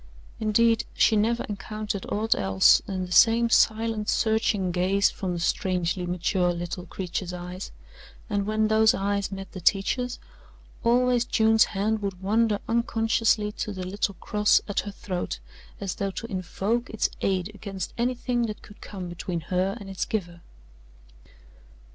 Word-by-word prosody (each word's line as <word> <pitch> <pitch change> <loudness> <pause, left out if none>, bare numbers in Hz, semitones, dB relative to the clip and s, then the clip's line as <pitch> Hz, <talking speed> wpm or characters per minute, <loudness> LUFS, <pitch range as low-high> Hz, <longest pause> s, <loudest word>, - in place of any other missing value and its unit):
Indeed, 225 +1 +3
she 220 - +4
never 225 +3 +1
encountered 210 -1 -5
aught 220 +2 +2
else 95 -1 +4
than 185 -2 -3
the 180 - -11
same 230 +5 +5
silent 220 -1 +2
searching 220 -4 +1
gaze 185 +3 +2
from 185 -2 -3
the 175 - -3
strangely 180 0 0
mature 180 +1 +1
little 175 +1 -5
creature's 180 0 -4
eyes, 180 +2 -7 0.6
and 205 -2 -1
when 215 0 +1
those 220 0 +4
eyes 200 +1 -1
met 195 0 -7
the 185 - -8
teacher's, 245 +7 +1 0.7
always 245 +1 +3
June's 220 -2 +4
hand 215 +2 -1
would 195 -3 -4
wander 215 +2 +2
unconsciously 225 -2 +1
to 210 - -4
the 185 -2 -5
little 200 +1 -2
cross 210 +3 +3
at 205 - -1
her 205 - -4
throat 180 - -4 0.4
as 195 -2 -3
though 200 - -2
to 195 - -6
invoke 200 +6 -2
its 220 - 0
aid 190 0 0
against 200 -2 -6
anything 240 0 0
that 215 - -7
could 205 - -15
come 190 -3 -7
between 175 0 -4
her 185 +5 -1
and 200 - -9
its 195 -1 -3
giver. 175 -5 -4
200 Hz, 150 wpm, -26 LUFS, 185-220 Hz, 0.7 s, same